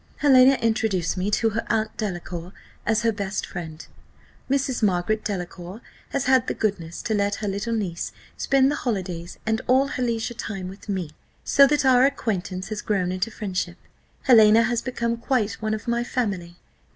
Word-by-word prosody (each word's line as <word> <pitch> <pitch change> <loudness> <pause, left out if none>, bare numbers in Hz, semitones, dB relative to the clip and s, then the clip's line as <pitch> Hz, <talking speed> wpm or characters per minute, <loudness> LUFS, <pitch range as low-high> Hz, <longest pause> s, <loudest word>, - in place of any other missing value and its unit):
Helena 265 -2 +6
introduced 215 -7 +1
me 185 +2 -1
to 225 +2 +2
her 225 +2 -2
aunt 220 0 0
Delacour 175 -3 -5 0.3
as 225 +1 +2
her 230 - +3
best 200 -1 -3
friend. 160 -3 -7 0.6
Mrs. 270 -2 0
Margaret 205 +1 +1
Delacour 180 0 -5 0.3
has 275 - -1
had 260 -1 +4
the - - -1
goodness 175 -6 -2
to 220 - -1
let 205 -1 +1
her 215 - -4
little 205 +4 -2
niece 180 -6 -3 0.2
spend 270 0 +3
the 295 - -2
holidays 185 -7 -3
and 220 +1 0
all 260 +2 +4
her - - -4
leisure 235 -1 -1
time 195 -5 -5
with 195 +3 -12
me, 185 -6 -2 0.3
so 280 -1 +6
that 290 0 +1
our 255 -1 +6
acquaintance 195 -9 -1
has 215 -1 -4
grown 185 -4 0
into 185 +4 -1
friendship. 185 -5 -4 0.5
Helena 225 -3 +7
has 235 0 0
become 235 -2 -2
quite 230 -4 -1
one 215 0 0
of 215 - -9
my 235 0 +1
family." 195 -9 -3
215 Hz, 175 wpm, -24 LUFS, 185-235 Hz, 0.6 s, Helena